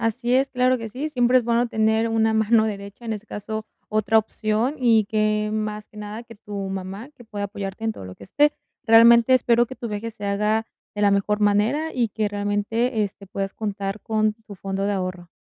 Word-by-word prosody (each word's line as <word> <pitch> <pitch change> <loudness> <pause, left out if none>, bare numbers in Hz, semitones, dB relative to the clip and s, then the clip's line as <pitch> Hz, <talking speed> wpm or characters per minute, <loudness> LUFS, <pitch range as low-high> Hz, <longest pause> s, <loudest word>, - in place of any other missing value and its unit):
Así 235 +2 -1
es, 265 +1 +3
claro 255 0 +2
que 225 -1 -6
sí, 265 +8 -4
siempre 250 -3 +3
es 250 - -1
bueno 235 +1 +2
tener 220 0 +1
una 225 0 +2
mano 220 0 +3
derecha, 200 +2 -7
en 225 - -2
ese 210 +1 -9
caso, 215 +1 -5 0.2
otra 215 +1 +1
opción, 220 +5 0
y 225 -5 +4
que, 215 0 0
más 215 -1 -3
que 210 - -20
nada, 210 +2 -6
que 230 -1 -14
tu 205 -1 -10
mamá, 195 +7 -6
que 240 - -14
pueda 205 -2 -5
apoyarte 200 +1 -6
en 225 - +1
todo 155 - -8
lo 95 - -9
que - - -17
esté. 295 +9 +2 0.3
Realmente, 235 +2 +7
espero 240 -1 +3
que 260 - -8
tu 235 -1 -6
viaje 215 +2 -4
se 205 - -9
haga 210 +2 0 0.3
de 205 - -2
la 205 - +5
mejor 205 +1 +1
manera, 215 +10 +2
y 235 -4 0
que 215 0 -1
realmente, 205 +3 0
este, 200 0 -5
puedas 195 0 -4
contar 200 -1 -4
con 215 -1 0
tu 205 - -9
fondo 195 +1 -3
de 205 - 0
ahorro. 185 -2 -4
215 Hz, 215 wpm, -23 LUFS, 205-235 Hz, 0.3 s, Realmente